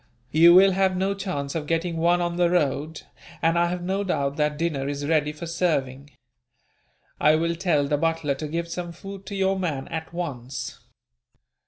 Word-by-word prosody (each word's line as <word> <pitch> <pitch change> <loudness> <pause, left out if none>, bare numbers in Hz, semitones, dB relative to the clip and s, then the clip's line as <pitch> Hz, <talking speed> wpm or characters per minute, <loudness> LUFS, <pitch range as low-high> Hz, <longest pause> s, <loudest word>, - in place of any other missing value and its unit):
You 170 +3 +7
will 195 +1 +7
have 190 0 +1
no 190 +2 +1
chance 180 -8 -4
of 155 -3 -4
getting 165 +1 -1
one 175 +2 +3
on 175 0 -1
the 175 -1 +3
road, 155 -2 -1 0.4
and 165 0 +2
I 170 0 +3
have 175 0 -3
no 190 +3 -1
doubt 140 -7 -1
that 150 -1 0
dinner 150 -4 -1
is 145 0 -3
ready 150 -1 +1
for 150 +3 -8
serving. 145 -5 -1 1.1
I 150 +1 +5
will 170 +1 0
tell 165 -5 +1
the 145 0 +1
butler 165 -2 0
to 150 +3 -5
give 170 +3 -3
some 175 0 -5
food 195 +3 -10
to 200 - -5
your 195 0 +1
man, 150 -7 -2
at 160 -1 -5
once." 135 -7 -5
165 Hz, 185 wpm, -25 LUFS, 150-180 Hz, 1.1 s, You